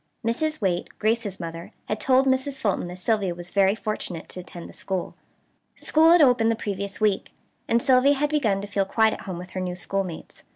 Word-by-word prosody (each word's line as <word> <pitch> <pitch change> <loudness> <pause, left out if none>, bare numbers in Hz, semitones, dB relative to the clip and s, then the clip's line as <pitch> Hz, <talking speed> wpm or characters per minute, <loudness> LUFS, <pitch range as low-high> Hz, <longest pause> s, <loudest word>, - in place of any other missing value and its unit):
Mrs. 310 +6 -1
Waite, 180 -3 0
Grace's 215 -3 -1
mother, 165 0 -7
had 215 - -2
told 260 +3 +4
Mrs. 265 +1 0
Fulton 200 -7 0
that 175 - -7
Sylvia 195 -2 0
was 175 0 -9
very 195 0 +3
fortunate 215 -6 -5
to - - -7
attend 175 -1 -9
the - - -13
school. 190 -2 -3 0.6
School 320 +1 +3
had 345 -2 +7
opened 245 -4 +4
the 230 - +2
previous 200 -2 -4
week, 210 -3 +1 0.4
and 235 +1 +2
Sylvia 270 +1 +5
had 295 +2 0
begun 220 -10 +1
to 205 - -6
feel 200 -1 0
quite 220 +3 +2
at - - -7
home 185 -3 -6
with 180 +1 -9
her 185 - -4
new 180 -1 -3
schoolmates. 185 -2 -4
205 Hz, 205 wpm, -25 LUFS, 185-255 Hz, 0.6 s, had